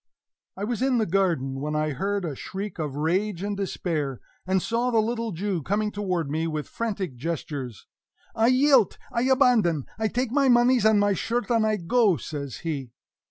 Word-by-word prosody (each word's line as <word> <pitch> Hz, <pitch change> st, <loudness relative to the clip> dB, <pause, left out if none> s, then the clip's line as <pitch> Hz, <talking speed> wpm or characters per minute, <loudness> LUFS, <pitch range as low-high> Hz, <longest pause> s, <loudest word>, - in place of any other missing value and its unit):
I 195 Hz, -, -4 dB
was 235 Hz, +2 st, -2 dB
in 260 Hz, -1 st, +2 dB
the 220 Hz, -, +2 dB
garden, 165 Hz, -8 st, 0 dB
when 150 Hz, +2 st, -3 dB
I 155 Hz, 0 st, 0 dB
heard 195 Hz, +6 st, -2 dB
a 150 Hz, -4 st, -4 dB
shriek 195 Hz, +6 st, -6 dB
of 150 Hz, -3 st, -3 dB
rage 180 Hz, +5 st, 0 dB
and 205 Hz, 0 st, -2 dB
despair, 160 Hz, -8 st, -2 dB, 0.3 s
and 190 Hz, 0 st, +2 dB
saw 235 Hz, +6 st, 0 dB
the 235 Hz, -, +1 dB
little 230 Hz, +1 st, 0 dB
Jew 185 Hz, 0 st, -2 dB
coming 210 Hz, +7 st, -1 dB
toward 185 Hz, -6 st, -2 dB
me 160 Hz, +3 st, -1 dB
with 155 Hz, -2 st, -3 dB
frantic 200 Hz, -, -3 dB
gestures. 140 Hz, -, -5 dB, 0.5 s
"I 225 Hz, +1 st, +2 dB
yielt! 255 Hz, -2 st, +4 dB
I 235 Hz, -, 0 dB
abandone! 220 Hz, -, +3 dB
I 220 Hz, -, +1 dB
take 245 Hz, +2 st, -2 dB
my 275 Hz, 0 st, +3 dB
moneys 240 Hz, -1 st, +4 dB
and 215 Hz, -1 st, +5 dB
my 205 Hz, 0 st, +3 dB
shirt, 240 Hz, +5 st, -2 dB
and 225 Hz, -2 st, +3 dB
I 215 Hz, -, +2 dB
go!" 200 Hz, 0 st, +2 dB
says 140 Hz, -4 st, -6 dB
he. 135 Hz, -7 st, -4 dB
195 Hz, 185 wpm, -25 LUFS, 155-230 Hz, 0.5 s, and